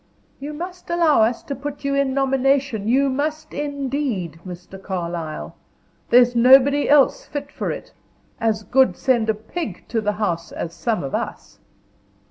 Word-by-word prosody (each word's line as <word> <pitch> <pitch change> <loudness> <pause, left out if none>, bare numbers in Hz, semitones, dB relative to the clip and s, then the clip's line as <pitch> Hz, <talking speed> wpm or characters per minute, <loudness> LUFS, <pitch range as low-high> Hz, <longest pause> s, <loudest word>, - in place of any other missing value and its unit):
"You 290 +2 -6
must 355 +3 -8
allow 335 -6 +3
us 225 +2 +1
to 280 - -5
put 285 +1 -7
you 280 - 0
in 275 -1 +1
nomination 270 -4 +1
you 270 +4 +3
must, 295 +4 -2
indeed, 275 - -3
Mr. 180 +1 -10
Carlyle. 170 - -4 0.6
There's 245 0 +5
nobody 270 +4 +5
else 285 -2 +4
fit 285 0 -6
for - - -4
it. - - -6 0.5
As 220 -2 0
good 265 +4 +3
send 240 -4 +1
a 220 - +2
pig 220 - -6
to 225 -2 0
the 210 -1 0
House 175 -5 -2
as 170 - -5
some 210 +2 -2
of 135 - -5
us." - - -5
255 Hz, 155 wpm, -21 LUFS, 210-280 Hz, 0.6 s, There's